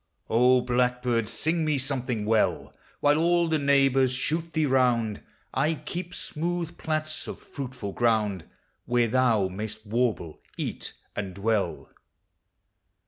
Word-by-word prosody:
O 125 Hz, +2 st, +5 dB
Blackbird! 125 Hz, -2 st, +1 dB
sing 160 Hz, +6 st, 0 dB
me 155 Hz, -2 st, +1 dB
something 130 Hz, -5 st, -1 dB
well: 110 Hz, 0 st, +1 dB, 0.3 s
While 145 Hz, +1 st, +4 dB
all 170 Hz, +1 st, +3 dB
the 160 Hz, -1 st, +1 dB
neighbors 135 Hz, -2 st, +3 dB
shoot 160 Hz, +6 st, -2 dB
thee 160 Hz, -2 st, +1 dB
round, 125 Hz, -5 st, +2 dB, 0.3 s
I 160 Hz, +2 st, +1 dB
keep 175 Hz, +4 st, -6 dB
smooth 170 Hz, +1 st, -3 dB
plats 155 Hz, 0 st, -2 dB
of -, -, -6 dB
fruitful 125 Hz, -7 st, -6 dB
ground, 105 Hz, -7 st, +1 dB, 0.4 s
Where 120 Hz, -1 st, +2 dB
thou 115 Hz, -5 st, +3 dB
inay'st 110 Hz, +3 st, -6 dB
warble, 110 Hz, -7 st, -1 dB, 0.2 s
eat, -, -, -4 dB, 0.2 s
and 95 Hz, -3 st, -4 dB
dwell. 105 Hz, +1 st, -1 dB
125 Hz, 125 wpm, -27 LUFS, 110-155 Hz, 0.4 s, O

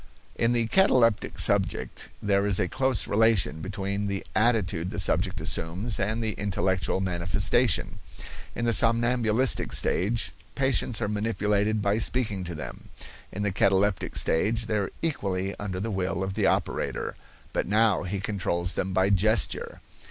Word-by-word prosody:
In 115 Hz, +1 st, +1 dB
the 120 Hz, -1 st, +2 dB
cataleptic 120 Hz, -, +2 dB
subject -, -, 0 dB
there 100 Hz, 0 st, +1 dB
is 100 Hz, -2 st, +1 dB
a 90 Hz, -, +1 dB
close 130 Hz, +3 st, 0 dB
relation 105 Hz, -7 st, +2 dB
between 100 Hz, +2 st, -3 dB
the 100 Hz, -1 st, -3 dB
attitude 105 Hz, -7 st, +1 dB
the -, -, -7 dB
subject -, -, +1 dB
assumes 95 Hz, +7 st, 0 dB
and 110 Hz, +4 st, -1 dB
the 110 Hz, -, -1 dB
intellectual 95 Hz, -3 st, -1 dB
manifestation. 95 Hz, +4 st, 0 dB, 0.6 s
In 115 Hz, -, -2 dB
the 115 Hz, -, +2 dB
somnambulistic 115 Hz, +2 st, +3 dB
stage 110 Hz, +5 st, +1 dB, 0.2 s
patients 130 Hz, -4 st, +1 dB
are -, -, 0 dB
manipulated 105 Hz, 0 st, 0 dB
by 100 Hz, +2 st, +1 dB
speaking 110 Hz, -6 st, -1 dB
to 85 Hz, -1 st, -6 dB
them; 75 Hz, -, -9 dB, 0.4 s
in 105 Hz, -, -4 dB
the 105 Hz, -, 0 dB
cataleptic 95 Hz, 0 st, +1 dB
stage 110 Hz, +8 st, +1 dB
they 110 Hz, -1 st, -1 dB
are 100 Hz, -2 st, -2 dB
equally 100 Hz, -, -2 dB
under 95 Hz, -3 st, -4 dB
the 110 Hz, +3 st, -3 dB
will 95 Hz, -1 st, -2 dB
of 95 Hz, 0 st, -3 dB
the 105 Hz, 0 st, +1 dB
operator; -, -, -2 dB, 0.4 s
but -, -, -1 dB
now 105 Hz, -1 st, +3 dB
he 95 Hz, +2 st, -4 dB
controls 90 Hz, -3 st, -1 dB
them 95 Hz, +1 st, -3 dB
by 95 Hz, +1 st, +2 dB
gesture. 105 Hz, +2 st, 0 dB
105 Hz, 150 wpm, -26 LUFS, 95-115 Hz, 0.6 s, somnambulistic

